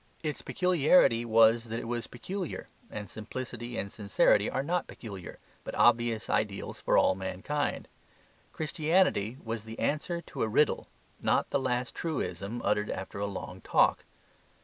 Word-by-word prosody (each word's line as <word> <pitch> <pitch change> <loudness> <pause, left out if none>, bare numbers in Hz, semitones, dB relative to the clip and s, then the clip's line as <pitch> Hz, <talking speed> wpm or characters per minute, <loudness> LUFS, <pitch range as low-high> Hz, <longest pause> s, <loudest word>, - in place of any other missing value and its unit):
Its 150 -2 -2
peculiarity 170 -9 +4
was 115 0 +5
that 115 0 -4
it 115 - -6
was 120 0 -3
peculiar, 180 - -5 0.2
and 105 -1 -6
simplicity 120 +3 -6
and 100 - -3
sincerity 100 0 +3
are 135 - -1
not 175 +4 -1
peculiar, 100 -6 -9 0.3
but - - -6
obvious 120 -2 +3
ideals 100 -2 -1
for - - +3
all - - +5
mankind. 95 +10 -2 0.6
Christianity 155 - +1
was 115 -1 -4
the 110 0 -9
answer 160 +4 -1
to - - -7
a - - +2
riddle, 140 +8 +2 0.3
not - - +1
the - - +2
last 125 -2 -1
truism 120 - -3
uttered 105 +1 +1
after 95 +1 -5
a 100 - -1
long 100 - -6
talk. - - +3
115 Hz, 150 wpm, -30 LUFS, 105-145 Hz, 0.6 s, was